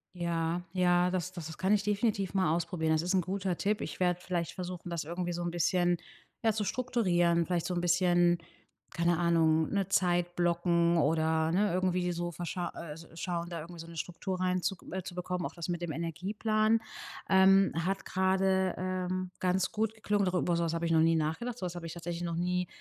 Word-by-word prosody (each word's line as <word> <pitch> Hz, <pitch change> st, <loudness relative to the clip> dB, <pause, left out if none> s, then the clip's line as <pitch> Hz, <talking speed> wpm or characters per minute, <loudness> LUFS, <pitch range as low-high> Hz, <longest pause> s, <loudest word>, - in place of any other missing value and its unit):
Ja, 170 Hz, 0 st, -1 dB
ja, 180 Hz, -1 st, +3 dB
das 180 Hz, -1 st, -2 dB
das 170 Hz, -4 st, -6 dB
das 160 Hz, -, -9 dB
kann 190 Hz, +2 st, +2 dB
ich 205 Hz, -2 st, +2 dB
definitiv 205 Hz, -2 st, 0 dB
mal 185 Hz, -5 st, +2 dB
ausprobieren. 170 Hz, -1 st, -1 dB
Das 155 Hz, 0 st, +3 dB
ist 180 Hz, +3 st, -1 dB
'n 185 Hz, -, +4 dB
guter 185 Hz, 0 st, -2 dB
Tipp. 210 Hz, +1 st, 0 dB
Ich -, -, -5 dB
werde 180 Hz, -1 st, +2 dB
vielleicht 175 Hz, -2 st, -2 dB
versuchen, 180 Hz, -1 st, -6 dB
das 170 Hz, -2 st, -2 dB
irgendwie 175 Hz, +3 st, -3 dB
so 175 Hz, 0 st, -3 dB
'n 175 Hz, -, -2 dB
bisschen, 175 Hz, +1 st, +2 dB, 0.5 s
ja, 225 Hz, -1 st, +3 dB
zu 215 Hz, 0 st, -1 dB
strukturieren. 180 Hz, -8 st, +1 dB
Vielleicht 175 Hz, -1 st, -1 dB
so 185 Hz, -, -2 dB
'n 175 Hz, -, 0 dB
bisschen, 175 Hz, 0 st, +3 dB, 0.5 s
keine 170 Hz, 0 st, +1 dB
Ahnung, 160 Hz, -2 st, +3 dB
'ne 195 Hz, -2 st, -1 dB
Zeit 175 Hz, -2 st, +1 dB
blocken 170 Hz, 0 st, +2 dB
oder, 160 Hz, +1 st, +2 dB
ne, 200 Hz, +4 st, +2 dB
irgendwie 180 Hz, -1 st, +1 dB
so, 175 Hz, 0 st, -3 dB
verscha 175 Hz, +1 st, -4 dB
äh, 150 Hz, -3 st, -8 dB, 0.2 s
schauen, 170 Hz, 0 st, -3 dB
da 170 Hz, -1 st, -5 dB
irgendwie 170 Hz, +2 st, -9 dB
so 165 Hz, -, -11 dB
'ne 170 Hz, 0 st, -10 dB
Struktur 180 Hz, +3 st, -4 dB
rein 185 Hz, 0 st, +1 dB
zu 195 Hz, -, 0 dB, 0.2 s
äh, 190 Hz, 0 st, -3 dB
zu 180 Hz, -, -7 dB
bekommen. 180 Hz, 0 st, -3 dB
Auch -, -, -5 dB
das 170 Hz, -2 st, -6 dB
mit 175 Hz, -1 st, -2 dB
dem 170 Hz, -2 st, -3 dB
Energieplan, 210 Hz, +8 st, 0 dB, 0.5 s
ähm, 195 Hz, +1 st, +6 dB
hat 190 Hz, +4 st, -1 dB
gerade, 190 Hz, 0 st, +2 dB
ähm, 185 Hz, 0 st, -2 dB
ganz 185 Hz, 0 st, +1 dB
gut 220 Hz, 0 st, 0 dB
geklungen, 210 Hz, -2 st, 0 dB
doch 185 Hz, 0 st, 0 dB
über 175 Hz, -1 st, +1 dB
sowas 170 Hz, -1 st, 0 dB
habe 165 Hz, 0 st, -1 dB
ich 165 Hz, -, 0 dB
noch 160 Hz, -, +5 dB
nie 165 Hz, 0 st, +4 dB
nachgedacht, 175 Hz, +11 st, -2 dB
sowas 180 Hz, -5 st, -4 dB
habe 175 Hz, -1 st, -6 dB
ich 165 Hz, -, -5 dB
tatsächlich 170 Hz, 0 st, -5 dB
noch 170 Hz, -1 st, -2 dB
nie, 180 Hz, +1 st, 0 dB
175 Hz, 210 wpm, -31 LUFS, 170-185 Hz, 0.5 s, ähm